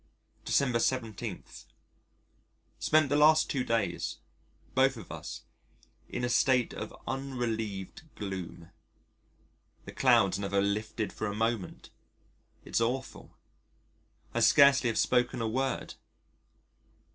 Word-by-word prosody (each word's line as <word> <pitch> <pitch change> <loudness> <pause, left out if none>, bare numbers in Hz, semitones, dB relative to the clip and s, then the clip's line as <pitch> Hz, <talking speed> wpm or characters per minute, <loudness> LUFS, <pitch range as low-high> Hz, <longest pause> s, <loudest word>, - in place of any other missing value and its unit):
December 125 -4 +2
17. 115 -4 -2 1.4
Spent 155 -1 +3
the 145 - +1
last 155 +1 +5
two 130 -3 0
days, 115 -2 -1 0.6
both 130 0 +3
of 115 - -10
us, - - -7 0.7
in - - -4
a - - +1
state 125 0 +2
of - - -6 0.2
unrelieved 115 -7 -4
gloom. 95 -4 -7 1.1
The - - -8
clouds 115 -8 +3
never 100 0 0
lifted 105 +2 -2
for 110 - -3
a 100 - -4
moment 110 -3 -2 0.7
it's - - 0
awful. 125 +3 -3 1.0
I - - 0
scarcely 140 -2 +6
have 115 - -2
spoken 125 0 +2
a 115 - -1
word.... 130 +3 -2
120 Hz, 110 wpm, -30 LUFS, 105-130 Hz, 1.4 s, scarcely